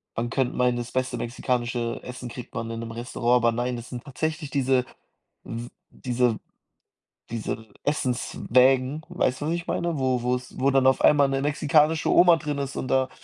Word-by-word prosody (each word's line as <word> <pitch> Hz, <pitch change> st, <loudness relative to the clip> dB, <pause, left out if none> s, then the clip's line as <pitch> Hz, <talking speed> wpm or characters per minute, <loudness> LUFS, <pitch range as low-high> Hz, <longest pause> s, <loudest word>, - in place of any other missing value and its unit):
man 120 Hz, +1 st, -2 dB
könnt 130 Hz, -2 st, 0 dB
meinen, 125 Hz, -1 st, +2 dB
das 120 Hz, 0 st, -5 dB
beste 130 Hz, -1 st, -1 dB
mexikanische 120 Hz, 0 st, -2 dB
Essen 125 Hz, 0 st, -7 dB
kriegt 125 Hz, +1 st, -9 dB
man 115 Hz, 0 st, -3 dB
in 115 Hz, -, -5 dB
'nem 115 Hz, 0 st, -6 dB
Restaurant, 120 Hz, +1 st, 0 dB
aber 115 Hz, -1 st, +3 dB
nein, 120 Hz, +2 st, -2 dB
das 120 Hz, -, -9 dB
sind 120 Hz, -1 st, -7 dB
tatsächlich 155 Hz, +2 st, -3 dB
diese 130 Hz, -2 st, +1 dB, 0.6 s
s 115 Hz, +1 st, -5 dB, 0.2 s
diese 125 Hz, -2 st, 0 dB, 0.9 s
diese 110 Hz, -1 st, -4 dB, 0.2 s
Essenswägen, 130 Hz, 0 st, +2 dB
weißt 145 Hz, -7 st, 0 dB
du, -, -, -2 dB
was 165 Hz, -, 0 dB
ich 170 Hz, -1 st, -3 dB
meine? 170 Hz, -2 st, -1 dB
Wo 130 Hz, -2 st, +1 dB
wo's 125 Hz, 0 st, -2 dB
wo 135 Hz, +1 st, +3 dB
dann 135 Hz, -1 st, +3 dB
auf 130 Hz, -, +3 dB
einmal 145 Hz, -2 st, +5 dB
'ne 135 Hz, 0 st, 0 dB
mexikanische 150 Hz, +2 st, +2 dB
Oma 175 Hz, -1 st, +6 dB
drin 145 Hz, -2 st, -3 dB
ist 140 Hz, -1 st, -4 dB
und 130 Hz, -, -3 dB
da, 130 Hz, 0 st, +2 dB
130 Hz, 180 wpm, -25 LUFS, 120-140 Hz, 0.9 s, Oma